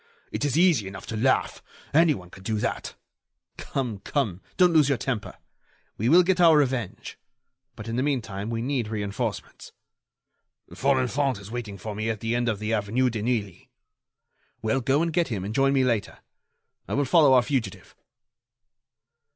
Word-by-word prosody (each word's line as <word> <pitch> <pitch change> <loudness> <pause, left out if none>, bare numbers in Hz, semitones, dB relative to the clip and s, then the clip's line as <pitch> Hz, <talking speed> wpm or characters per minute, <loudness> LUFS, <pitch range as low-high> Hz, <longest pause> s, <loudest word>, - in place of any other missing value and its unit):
It - - -3
is 145 0 0
easy 165 - +3
enough 95 0 -9
to 110 - -5
laugh! 130 +5 +1 0.3
Anyone 145 - +2
can 95 - -13
do 110 +3 -2
that." - - -3 0.6
"Come, 120 -7 -3
come, 100 - -2 0.2
don't 180 -2 +5
lose 150 -3 +5
your 140 - +2
temper! 125 -2 -4 0.6
We 115 +4 0
will 175 +5 +7
get 180 0 +1
our 165 -3 +7
revenge. 130 -8 -2 0.6
But, 110 - -9
in 115 +1 -3
the - - +1
meantime, 110 -7 -2
we 115 0 -2
need 130 -4 -1
reinforcements." 105 -2 -5 1.0
"Folenfant 135 -1 +1
is 100 +1 -11
waiting 115 -5 -5
for 105 +3 -6
me 110 +2 -3
at 110 -2 -2
the 115 +2 -1
end 120 0 0
of 110 - -1
the 110 +2 -3
avenue 115 +4 +1
de 110 -2 -4
Neuilly." 110 -5 -3 0.9
"Well, 120 +5 +1
go 135 +6 +2
and 170 -1 -2
get 170 +1 +2
him 100 -6 -4
and 105 - -4
join 135 +3 +3
me 135 -1 +3
later. 115 -5 -1 0.7
I - - -2
will 145 +1 +1
follow 145 -1 +5
our 125 - +5
fugitive." 135 -3 -3
120 Hz, 170 wpm, -25 LUFS, 110-140 Hz, 1.0 s, will